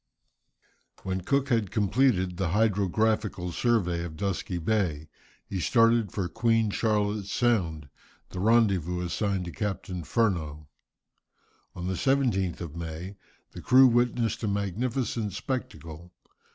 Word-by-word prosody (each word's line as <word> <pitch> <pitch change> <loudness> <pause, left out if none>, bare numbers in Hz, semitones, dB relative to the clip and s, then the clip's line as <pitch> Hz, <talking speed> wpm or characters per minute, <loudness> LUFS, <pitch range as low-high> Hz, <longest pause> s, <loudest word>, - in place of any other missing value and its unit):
When 95 0 -2
Cook 140 +8 0
had 115 -6 +1
completed 100 -4 +1
the 95 - 0
hydrographical 105 -1 +1
survey 90 -6 0
of 80 -2 -7
Dusky 95 -1 -2
Bay, 85 -5 -1 0.4
he 95 - -4
started 115 +1 +3
for 95 -4 -2
Queen 115 +1 +1
Charlotte's 105 -2 0
Sound, 90 - 0 0.4
the 90 - -6
rendezvous 95 -5 +2
assigned 95 +1 -1
to 85 - -6
Captain 95 -3 -4
Furneaux. 80 -9 -1 1.1
On 90 - -6
the 95 - -1
17th 95 -5 0
of 85 -3 -7
May 85 +3 -6 0.4
the - - -9
crew 130 +1 +6
witnessed 120 -2 +1
a - - 0
magnificent 105 +2 -2
spectacle. 90 - -6
100 Hz, 120 wpm, -27 LUFS, 90-115 Hz, 1.1 s, crew